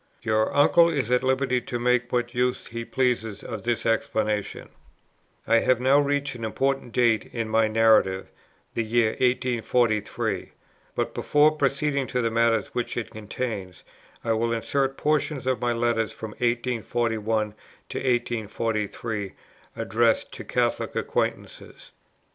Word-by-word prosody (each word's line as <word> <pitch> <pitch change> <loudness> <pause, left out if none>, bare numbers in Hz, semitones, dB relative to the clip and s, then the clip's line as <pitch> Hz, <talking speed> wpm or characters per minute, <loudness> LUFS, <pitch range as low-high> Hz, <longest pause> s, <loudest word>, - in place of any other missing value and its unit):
"Your 110 -1 +1
uncle 170 +4 +6
is 135 -7 -1
at 125 +1 +3
liberty 130 -1 +1
to 120 - -4
make 125 0 +1
what 120 0 -1
use 125 0 0
he 115 0 -6
pleases 115 -4 -1
of 110 -4 -6
this 120 -2 -1
explanation." 110 -2 -1 0.8
I 115 - +4
have 130 +1 +2
now 135 +3 +4
reached 145 -1 0
an 120 -2 -8
important 135 +3 -1
date 115 -2 +2
in 115 -2 -3
my 110 0 +3
narrative, 110 -4 +3 0.4
the 115 - 0
year 115 0 +2
1843; 120 -3 0 0.4
but - - -1
before 150 +1 +3
proceeding 140 -1 0
to 125 - -1
the 115 - 0
matters 115 0 +2
which 120 - -3
it 120 - -3
contains, 105 -3 -5 0.4
I 115 - 0
will 115 +1 0
insert 135 +4 -1
portions 150 -2 0
of 130 -1 0
my 120 0 +1
letters 115 -1 0
from 110 -1 -7
1841 115 -2 -1 0.4
to - - -3
1843, 110 -4 -2 0.4
addressed 115 +3 +1
to - - -7
Catholic - - -1
acquaintances. - - -3
120 Hz, 135 wpm, -25 LUFS, 110-130 Hz, 0.8 s, uncle